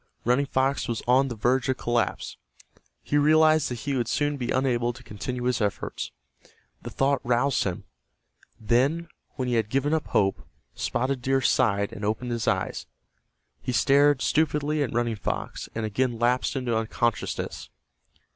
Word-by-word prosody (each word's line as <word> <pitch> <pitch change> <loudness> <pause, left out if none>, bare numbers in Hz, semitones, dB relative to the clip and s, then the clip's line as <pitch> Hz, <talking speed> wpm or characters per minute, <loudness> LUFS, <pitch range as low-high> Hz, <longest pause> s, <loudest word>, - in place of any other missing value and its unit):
Running 125 +4 +2
Fox 135 +1 0
was 115 -2 -3
on 130 +2 +4
the 120 - -5
verge 125 +4 +1
of 130 - +1
collapse. 120 -4 -1 0.7
He 145 - +1
realized 155 +1 +4
that 120 -2 -5
he 140 -1 -2
would 120 -3 0
soon 145 0 0
be 125 -3 -4
unable 120 -2 +1
to 125 +1 -14
continue 125 +3 -5
his 125 -1 0
efforts. 105 -1 -3 0.7
The - - -7
thought 135 +1 +1
roused 125 +2 +1
him. 95 -3 -3 0.8
Then, 135 +10 +1 0.3
when 130 - -2
he 125 - 0
had 110 -3 +1
given 135 +5 +1
up 160 -1 0
hope, 95 -1 +1 0.3
Spotted 130 - -1
Deer 135 +2 +2
sighed 100 -5 +2
and 100 - -8
opened 110 +4 -2
his 115 -2 -2
eyes. - - -1 0.7
He 130 - -3
stared 140 +3 +4
stupidly 150 -1 +1
at 140 - -1
Running 120 -2 0
Fox, - - -4
and 110 0 -2
again 120 +3 -1
lapsed 120 +4 +1
into 125 -3 -1
unconsciousness. 115 +1 -2
125 Hz, 160 wpm, -26 LUFS, 120-140 Hz, 0.8 s, on